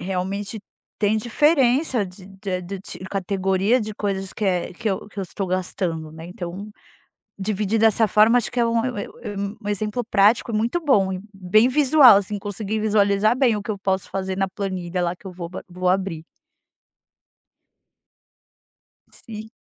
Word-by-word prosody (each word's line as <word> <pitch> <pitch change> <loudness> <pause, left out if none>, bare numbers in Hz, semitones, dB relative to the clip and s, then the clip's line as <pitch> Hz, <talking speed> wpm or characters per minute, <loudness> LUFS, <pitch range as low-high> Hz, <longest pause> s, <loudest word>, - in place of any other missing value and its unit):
Realmente, 195 +3 -3 0.4
tem 210 +1 +2
diferença 255 0 +2
de 185 0 -11
de 190 -1 -4
de 195 +2 -7
categoria 195 +4 +1
de 215 -1 -5
coisas 195 -2 -3
que 215 - -4
é 180 -2 0
que 220 +3 -2
eu 195 - -3
que 200 -1 -7
eu - - -2
estou 190 +1 -4
gastando, 180 -3 -2
né. 160 +1 -10
Então, 180 +3 -7 0.7
dividir 210 +2 -1
dessa 225 0 +4
forma 215 +4 +5
acho 235 - -3
que 245 - 0
é - - +4
um 230 0 +1
eu 250 -3 -2
eu - - -6
e 205 - -5 0.3
um 205 - -3
exemplo 210 +3 -2
prático 215 +2 +3
muito 225 +9 0
bom 205 - +3
e 185 - -3 0.2
bem 195 +5 +3
visual. 270 -4 +7
Assim, 205 +1 -4
consegui 205 +1 -4
visualizar 210 0 +3
bem 245 -5 +3
o 205 - -4
que 215 - -5
eu 205 - -3
posso 190 -1 -1
fazer 190 -1 -3
na 195 0 +1
planilha 185 -2 -3
lá, 175 0 -1
que 195 - -15
eu 185 - -7
vou 175 -1 -7
ba 185 - -8
vou 180 +1 -2
abrir. 185 -4 0 2.9
Sim. 220 -1 -10
200 Hz, 170 wpm, -22 LUFS, 185-220 Hz, 2.9 s, visual